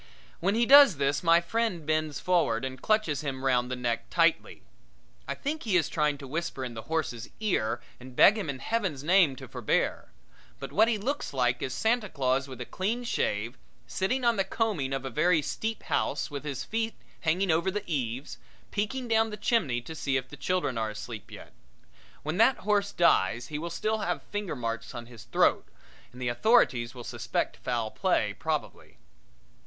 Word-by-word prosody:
When 195 +4 +1
he 235 +1 +3
does 275 - +8
this 140 +1 +1
my 170 -1 +5
friend 185 -3 -1
bends 155 -1 0
forward 165 -10 +1
and 130 0 -6
clutches 215 -9 +1
him 135 -2 -4
round 125 -2 +2
the 125 - -2
neck 120 -2 -2
tightly. - - +1 0.6
I - - -2
think 310 +3 -3
he 205 -5 +2
is 165 - +1
trying 150 -2 +1
to 140 - -9
whisper 145 -2 -3
in 120 - -6
the 110 - -6
horse's 125 -9 -2
ear 120 - 0 0.2
and 125 0 -12
beg 205 - +7
him 200 -8 -3
in 140 - -3
Heaven's 185 - -2
name 170 -4 +4
to - - -10
forbear; - - -1 0.5
but - - -7
what 220 +2 +4
he 230 -2 +1
looks 265 - -3
like 125 -1 +1
is 130 - -2
Santa 220 - +1
Claus 135 -2 0
with 130 -2 -9
a 125 - -4
clean 220 - -2
shave, 115 - -1 0.3
sitting 245 - -1
on 235 -2 +3
the 195 - +3
combing 190 - -1
of 135 0 -2
a 135 - -4
very 170 +7 +3
steep 220 +9 -3
house - - -1
with 145 0 -6
his 135 -3 -3
feet 225 +8 -2 0.2
hanging 175 +3 +1
over 170 +4 +2
the 205 +1 -3
eaves, 130 -3 -3 0.3
peeking 240 +5 -2
down 225 -1 +3
the 210 - -6
chimney 175 - +1
to 160 - -8
see 140 -3 0
if 130 0 -5
the - - -9
children 140 -4 -1
are 110 -1 -1
asleep 110 0 -8
yet. - - -11 0.7
When 155 +3 -2
that 230 +4 +5
horse 205 -1 +2
dies 120 - +2
he 150 -1 -4
will 170 +2 -4
still 215 +6 -1
have - - -2
finger 205 -3 -3
marks 115 -1 -4
on 120 - -6
his 115 -1 -13
throat 120 - +2 0.4
and 125 - -13
the 125 - -2
authorities 120 - +3
will 120 - -8
suspect - - -2
foul 115 -3 -2
play - - +1
probably. - - -4
155 Hz, 190 wpm, -28 LUFS, 130-210 Hz, 0.7 s, does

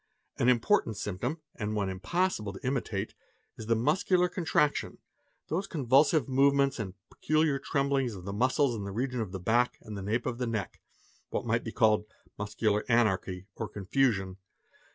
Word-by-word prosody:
An 120 - +4
important 120 - +2
symptom 115 - -3
and 105 0 -3
one 100 -2 0
impossible 105 - -1
to 95 - -10
imitate 110 -6 -2 0.4
is 110 - -9
the 115 - +3
muscular 175 - +2
contraction, 160 -4 0 0.5
those 185 +5 -2
convulsive 140 - +3
movements 140 0 +3
and 95 -3 -4 0.2
peculiar 155 -2 +1
tremblings 135 -4 0
of 90 -2 -10
the 100 - -4
muscles 130 +3 +2
in 105 - -4
the 100 - -5
region 125 +3 -2
of 105 -5 -4
the 95 - -5
back 120 +7 +2
and 110 - -9
the 100 - -5
nape 110 +5 -1
of 125 -1 -3
the 125 - -1
neck; 110 -3 -4 0.5
what - - -3
might 115 0 +1
be 115 - -5
called 105 -2 +3 0.3
"muscular 105 0 0
anarchy," 95 -5 +1
or 110 +1 -5
confusion. 95 -2 0
115 Hz, 165 wpm, -29 LUFS, 105-140 Hz, 0.5 s, An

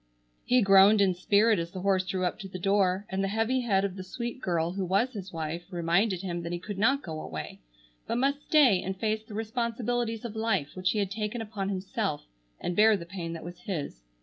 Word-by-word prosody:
He 250 -2 +4
groaned 195 +2 +7
in 195 -2 +4
spirit 205 +4 +3
as 170 0 -3
the 185 +1 -7
horse 190 -1 +2
drew 185 -1 -1
up 180 - -2
to 200 - -6
the 185 - -7
door, 195 +1 +1
and 190 +1 -2
the - - +1
heavy 225 +5 +1
head 200 -6 +2
of 190 -2 -4
the 190 - -6
sweet 240 +6 -5
girl 170 -2 0
who 190 +1 -3
was 200 +8 +1
his 195 -3 -7
wife 165 +1 -4
reminded 180 +2 +1
him 175 -2 -3
that 170 0 -5
he 175 - -1
could 195 +2 -7
not 270 +6 +3
go 160 -2 -5
away, 80 -1 -7 0.5
but - - -1
must 280 +3 +1
stay 270 -12 +4
and 190 0 -4
face 215 +1 -1
the 215 -1 -11
responsibilities 235 0 -2
of 225 -2 -6
life 220 -10 0
which 185 0 0
he 215 - 0
had 200 -2 0
taken 215 +3 -3
upon 210 -3 -4
himself, 190 - -2 0.3
and 175 - -3
bear 215 +1 +6
the 170 - -8
pain 170 -2 -5
that 165 - -7
was 175 0 -8
his. 150 - -5
195 Hz, 230 wpm, -28 LUFS, 180-220 Hz, 0.5 s, groaned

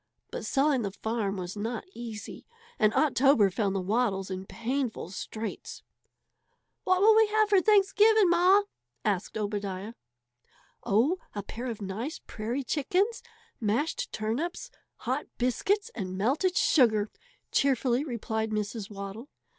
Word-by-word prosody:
But - - -5
selling 275 -2 +2
the 205 - -2
farm 210 0 -2
was 180 +1 -5
not 225 +3 -4
easy, 230 -5 -8 0.3
and 215 -1 +4
October 270 -8 +4
found 200 0 -1
the - - +1
Waddles 195 -1 0
in 190 +1 -5
painful 240 -5 -3
straits. 215 +3 -6 1.0
"What 370 0 +3
will 435 +2 +7
we 440 0 +6
have 430 0 +2
for 395 -2 +5
Thanksgiving, 420 +1 +5
Ma?" 360 +4 +5 0.4
asked 200 -1 -1
Obadiah. 205 0 -3 0.9
"Oh, 260 - +2 0.2
a 205 - -3
pair 235 +5 -6
of 225 -4 -5
nice 220 +10 -4
prairie 235 +6 -4
chickens, 365 - 0 0.4
mashed 290 - -1
turnips, 300 - -3 0.2
hot - - -3
biscuits, 385 - 0
and 185 -4 -5
melted 300 - +1
sugar," 220 - +3 0.4
cheerfully 265 -1 +2
replied 220 -5 -3
Mrs. 215 0 -3
Waddle. 200 +6 -7
235 Hz, 130 wpm, -28 LUFS, 205-315 Hz, 1.0 s, will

